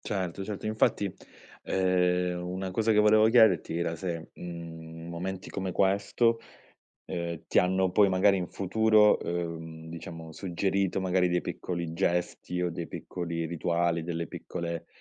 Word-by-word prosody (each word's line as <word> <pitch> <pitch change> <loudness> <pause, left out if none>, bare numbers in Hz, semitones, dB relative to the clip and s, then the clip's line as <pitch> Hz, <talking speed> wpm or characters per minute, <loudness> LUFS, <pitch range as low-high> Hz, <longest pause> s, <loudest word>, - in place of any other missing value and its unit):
Certo, 95 -1 -3
certo. 105 +1 -5
Infatti, 105 -2 +1 0.5
ehm, 90 -1 +1
una 90 +2 -4
cosa 110 +4 +2
che 105 - +3
volevo 110 +1 +6
chiederti 110 -9 +4
era 85 -1 -1
se, 85 -2 -5
mhmm, 80 -1 -8
momenti 90 +2 -5
come 95 -1 -3
questo, 100 +5 +2 0.7
ehm, 85 -2 -4
ti - - +3
hanno 95 +1 +3
poi, 105 -1 +5
magari 95 +1 +4
in 90 -1 -3
futuro, 105 +2 +4
uhm, 80 -2 -4
diciamo 80 0 -8
suggerito 95 +2 -1
magari 90 -1 +2
dei 90 0 +1
piccoli 85 -2 -4
gesti 90 0 -1
o 90 - 0
dei 85 0 -5
piccoli 85 -2 -4
rituali, 85 0 0
delle 85 -1 -3
piccole 85 -1 -5
90 Hz, 140 wpm, -29 LUFS, 85-95 Hz, 0.7 s, volevo